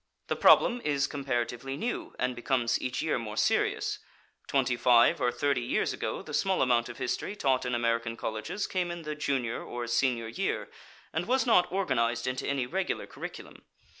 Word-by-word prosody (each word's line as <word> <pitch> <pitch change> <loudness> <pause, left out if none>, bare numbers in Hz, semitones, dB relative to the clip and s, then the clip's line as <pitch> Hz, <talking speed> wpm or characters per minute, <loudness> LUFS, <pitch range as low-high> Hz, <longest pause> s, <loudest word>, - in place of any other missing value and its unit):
The - - +1
problem 245 0 +5
is 140 -2 +1
comparatively 135 -1 -3
new, 240 +10 -4
and 125 0 -1
becomes 120 -1 0
each 125 +4 -2
year 160 -5 0
more 110 -2 -6
serious. - - +1 0.5
Twenty 130 -2 +1
five 120 -1 +5
or 120 - +2
thirty 130 +1 0
years 120 - 0
ago - - -4
the - - -9
small 190 -5 +2
amount 120 -2 +2
of - - -8
history 195 +10 -2
taught 130 -8 +1
in 125 - 0
American 115 -1 0
colleges 110 - -3
came 180 -2 -1
in 175 -1 -5
the 150 0 -3
junior 135 -6 -2
or 120 0 -5
senior 120 -1 +1
year, 195 +11 -2 0.4
and - - -2
was 260 +2 +2
not 225 -7 +4
organized 120 -12 0
into 130 0 -2
any 140 -3 0
regular 185 +8 -2
curriculum. - - -9
130 Hz, 175 wpm, -29 LUFS, 120-150 Hz, 0.5 s, problem